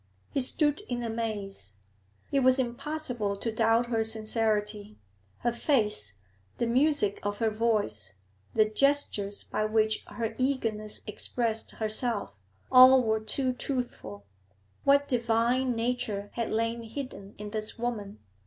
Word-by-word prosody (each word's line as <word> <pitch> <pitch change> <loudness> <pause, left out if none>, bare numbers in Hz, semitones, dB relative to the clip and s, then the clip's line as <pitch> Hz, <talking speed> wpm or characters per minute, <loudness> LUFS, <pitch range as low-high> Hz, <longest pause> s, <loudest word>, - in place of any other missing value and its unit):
He 275 - +1
stood 295 +5 +2
in 240 -1 -2
amaze. 210 - -4 0.6
It 275 - +3
was 260 0 +4
impossible 250 -4 -2
to 230 - -2
doubt 225 +1 +3
her 230 -2 0
sincerity; 215 -1 0 0.4
her 240 - +1
face, 210 - 0 0.4
the - - 0
music 250 -3 +2
of 205 0 -2
her 225 -1 +1
voice, 210 - -1 0.4
the 215 - +5
gestures 215 -4 +1
by 215 - -2
which 215 0 +1
her 225 -1 -4
eagerness 225 -6 -1
expressed 225 +1 -2
herself, 215 - -1 0.4
all 255 0 +9
were 220 -1 +1
too 255 +4 +1
truthful. 245 - -5 0.6
What 280 0 +5
divine 240 +1 +1
nature 225 -4 -2
had 230 -1 -2
lain 230 +1 -1
hidden 225 -4 -8
in 210 0 -7
this 215 +1 -3
woman! 220 -4 -4
225 Hz, 125 wpm, -29 LUFS, 215-250 Hz, 0.6 s, all